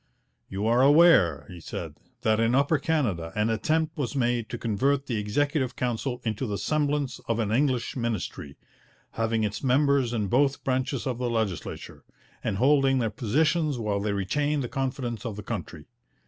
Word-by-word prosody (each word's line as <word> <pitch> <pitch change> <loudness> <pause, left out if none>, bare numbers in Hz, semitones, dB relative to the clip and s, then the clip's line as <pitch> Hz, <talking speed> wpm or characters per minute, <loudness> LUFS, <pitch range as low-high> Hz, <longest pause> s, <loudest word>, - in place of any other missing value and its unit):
'You 100 +2 -3
are 120 +3 +3
aware,' 135 - +5
he 90 - -10
said, - - -6 0.3
'that 110 0 +2
in 115 +2 +2
Upper 140 +3 +3
Canada 120 - -1
an 105 +1 +1
attempt 155 +8 0
was 140 0 -2
made 120 -3 0
to 120 - -4
convert 135 +6 0
the 120 -5 -2
Executive 130 +4 0
Council 125 +1 -2
into 110 +3 -2
the 100 -1 -2
semblance 145 -3 -1
of 115 - 0
an 110 -3 -1
English 130 0 +1
ministry, 110 - -4 0.5
having 115 -1 0
its 105 +4 -3
members 135 -1 +3
in 110 -4 -1
both 135 +7 +1
branches 130 0 -1
of 125 -3 -2
the 125 -1 -1
legislature, 110 -6 -4 0.4
and 95 - -1
holding 135 +2 +4
their 115 -4 0
positions 150 +5 +1
while 105 -3 -1
they 105 +1 -1
retained 145 +9 0
the - - -3
confidence 130 -4 -3
of 115 -4 -4
the 105 - -7
country. - - -6
125 Hz, 170 wpm, -26 LUFS, 110-140 Hz, 0.5 s, aware